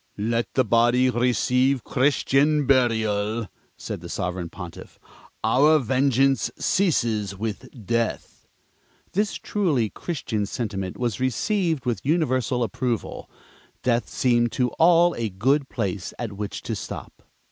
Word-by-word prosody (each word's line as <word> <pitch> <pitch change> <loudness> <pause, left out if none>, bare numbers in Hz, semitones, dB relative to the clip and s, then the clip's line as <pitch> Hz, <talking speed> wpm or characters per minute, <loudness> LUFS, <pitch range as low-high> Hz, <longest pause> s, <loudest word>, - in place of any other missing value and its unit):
"Let 115 +3 -1
the 130 - +3
body 120 +3 +3
receive 125 +2 +2
Christian 145 +2 +2
burial," 110 -4 +1 0.3
said - - -6
the - - -9
Sovereign 90 -1 -3
Pontiff. 90 -2 -10 0.5
"Our 140 +8 +5
vengeance 135 0 +2
ceases 115 - 0
with 110 0 -5 0.2
death." 115 +2 -2 0.6
This 205 +2 0
truly 150 - 0
Christian 110 - -3
sentiment 100 -6 -4
was 120 -3 -2
received 160 - 0
with 115 -6 -2
universal 130 -6 +1
approval. 115 +1 -3 0.5
Death 120 -1 +1
seemed 120 -2 +2
to 125 -1 +1
all 170 +1 +5
a 115 -2 -1
good 135 +9 +1
place 100 -5 -3
at 115 -4 -4
which 100 0 -5
to - - -3
stop. - - -8
120 Hz, 120 wpm, -24 LUFS, 110-135 Hz, 0.6 s, Our